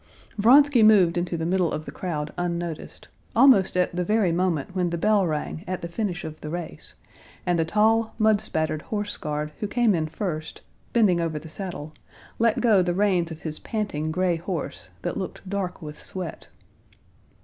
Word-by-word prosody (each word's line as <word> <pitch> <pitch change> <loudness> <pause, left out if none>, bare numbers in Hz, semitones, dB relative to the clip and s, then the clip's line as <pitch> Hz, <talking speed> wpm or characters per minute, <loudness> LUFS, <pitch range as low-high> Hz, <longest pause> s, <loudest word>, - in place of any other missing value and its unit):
Vronsky 255 +4 +6
moved 200 -6 +6
into 175 -1 -1
the 160 - -2
middle 180 -1 +1
of 155 - -4
the - - -7
crowd 155 -5 -4
unnoticed, 170 -2 -4 0.3
almost 235 -7 +5
at 180 -1 +1
the 180 - 0
very 210 -1 +2
moment 175 -1 -1
when 180 -2 +1
the 170 - -2
bell 205 +1 +3
rang 155 +1 -3
at 185 -1 -4
the - - -2
finish 180 0 -3
of 155 -1 -8
the 150 - -6
race, 175 +1 -6 0.5
and 175 -1 +1
the 165 - +2
tall, 220 +5 +2
mudspattered 205 -8 +1
horse 205 +2 -3
guard 150 0 -3
who 210 - -2
came 235 -1 +2
in 160 -3 0
first, 160 -1 -5 0.3
bending 195 -7 +3
over 165 -2 -2
the 155 - -8
saddle, 160 -4 -6 0.5
let 230 -1 +2
go 220 -6 +5
the 175 -1 0
reins 185 -4 +2
of 160 -1 -8
his 155 -1 -5
panting 195 -9 -3
gray 180 0 +1
horse 155 - -4
that - - -2
looked 195 0 -6
dark 185 -2 -3
with 150 0 -8
sweat. 185 -3 -6
180 Hz, 180 wpm, -25 LUFS, 160-205 Hz, 0.5 s, Vronsky